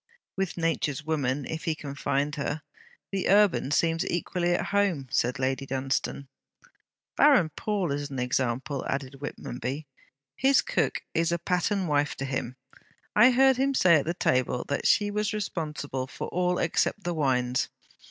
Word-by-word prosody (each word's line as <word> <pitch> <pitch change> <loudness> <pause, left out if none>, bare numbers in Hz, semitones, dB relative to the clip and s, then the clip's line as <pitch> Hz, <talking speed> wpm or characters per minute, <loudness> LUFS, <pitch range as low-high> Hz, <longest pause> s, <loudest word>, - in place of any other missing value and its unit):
'With 190 -2 -2
nature's 160 -3 -1
woman, 145 -3 -1
if 160 0 -5
he 160 - 0
can 145 -2 -7
find 140 +1 -1
her, 150 +1 -3 0.5
the 195 -1 -1
urban 200 -8 +4
seems 165 +2 +2
equally 175 0 0
at - - -1
home,' 190 -10 +1
said 125 +3 +1
Lady 130 +1 -1
Dunstane. 135 +1 -2 0.9
'Baron 260 - +5
Pawle 200 -7 -1
is 145 +1 -3
an 135 - -6
example,' 130 +2 -1
added 135 0 -4
Whitmonby. 140 0 -5 0.5
'His 270 0 +4
cook - - -1
is 165 +1 +1
a 170 - +1
pattern 180 +3 0
wife 145 -2 +1
to 135 - -4
him. 130 -2 -3 0.6
I 230 +4 +8
heard 265 +1 +4
him 275 +1 +1
say 185 -8 +5
at 170 +4 -2
table 125 -1 +1
that 140 - 0
she 205 -1 +3
was 210 +1 -1
responsible 150 -9 -3
for - - -6
all 180 0 0
except 175 +4 0
the 175 - -1
wines. 130 -5 +1
155 Hz, 155 wpm, -27 LUFS, 135-185 Hz, 0.9 s, I